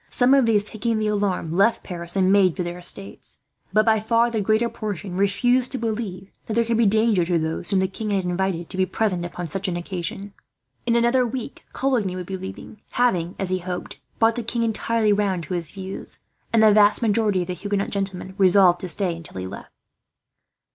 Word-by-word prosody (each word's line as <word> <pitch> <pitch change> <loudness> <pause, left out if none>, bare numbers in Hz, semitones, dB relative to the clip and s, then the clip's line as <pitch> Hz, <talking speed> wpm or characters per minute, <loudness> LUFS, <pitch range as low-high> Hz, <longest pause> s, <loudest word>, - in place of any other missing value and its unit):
Some 250 +2 +3
of 270 -4 +4
these, 210 -3 +4
taking 225 +2 -2
the 215 - -1
alarm, 200 -6 -1
left 215 +6 +3
Paris 170 -1 -6
and 190 -1 +3
made 195 -4 +4
for 185 - -2
their 175 +1 -5
estates; 195 +2 -4 0.3
but 215 0 +3
by 220 -1 +4
far 230 +2 +2
the 220 -2 -1
greater 220 +3 +2
portion 205 -5 -5
refused 245 +6 +2
to - - -1
believe 215 -5 -4 0.2
that 215 - -3
there 230 0 +3
could 230 0 0
be 230 -2 +4
danger 215 -2 +3
to 170 0 +1
those 160 +1 -2
whom 195 - +2
the 190 - +1
king 210 +3 -5
had 195 -2 0
invited 180 -1 -1
to - - -4
be 185 0 +2
present 185 -5 0
upon 175 0 -5
such 195 +5 -3
an 175 -2 -2
occasion. 185 +3 -5 0.5
In 235 - +3
another 240 +2 +3
week, 250 +2 -5
Coligny 235 -9 0
would 180 -1 -5
be 190 - -5
leaving, 190 +3 -9
having, 185 -8 +1
as 190 -2 -2
he 185 - +1
hoped, 180 0 -6 0.2
brought 225 0 +4
the 240 - -3
king 235 +1 -1
entirely 225 -1 +1
round 195 -4 0
to 185 - -6
his 170 -3 -2
views; 190 -1 -7 0.3
and 225 -1 +4
the 215 -1 +7
vast 210 +2 +4
majority 210 -3 +2
of - - -9
the - - -1
Huguenot 200 +2 -2
gentlemen 195 -2 -3
resolved 185 -2 +5
to 185 - -4
stay 180 -1 -1
until 165 - -9
he 95 - -4
left. 95 +2 -9
200 Hz, 215 wpm, -23 LUFS, 180-225 Hz, 0.5 s, the